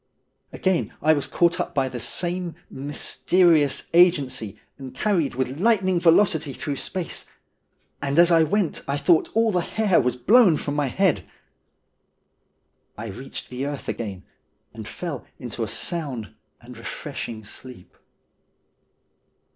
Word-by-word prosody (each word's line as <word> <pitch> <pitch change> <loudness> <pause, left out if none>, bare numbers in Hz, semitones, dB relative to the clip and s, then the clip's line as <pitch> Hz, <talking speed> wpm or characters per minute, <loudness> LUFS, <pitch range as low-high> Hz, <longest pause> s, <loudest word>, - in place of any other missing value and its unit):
Again 190 -2 -1
I 155 +1 +4
was 145 -3 -1
caught 175 +1 +2
up 180 - -3
by 135 -2 +2
the 125 -1 -6
same 175 +6 -2 0.2
mysterious 150 +2 +2
agency, 145 - +3 0.2
and 130 -1 -9
carried 170 -7 0
with 130 +2 -2
lightning 190 -4 +3
velocity 165 -4 +3
through 140 +2 -4
space, 185 +3 -4 0.7
and 140 +1 -1
as 175 0 +6
I 165 -1 +6
went 170 +2 0
I 140 +1 0
thought 160 +3 +3
that - - -19
all 225 0 +3
the 180 - +1
hair 205 0 +2
was 125 -1 0
blown 190 - +5
from 145 - -3
my 145 -2 +1
head. 190 +6 +1 1.7
I 110 +1 -6
reached 125 +7 -8
the 130 +3 -3
earth 145 -1 -6
again, 100 -5 -5 0.5
and - - -8
fell - - -5
into - - -7
a - - -2
sound 140 - -4 0.3
and - - -12
refreshing 110 -2 -6
sleep. 115 -1 -11
155 Hz, 140 wpm, -24 LUFS, 130-180 Hz, 1.7 s, as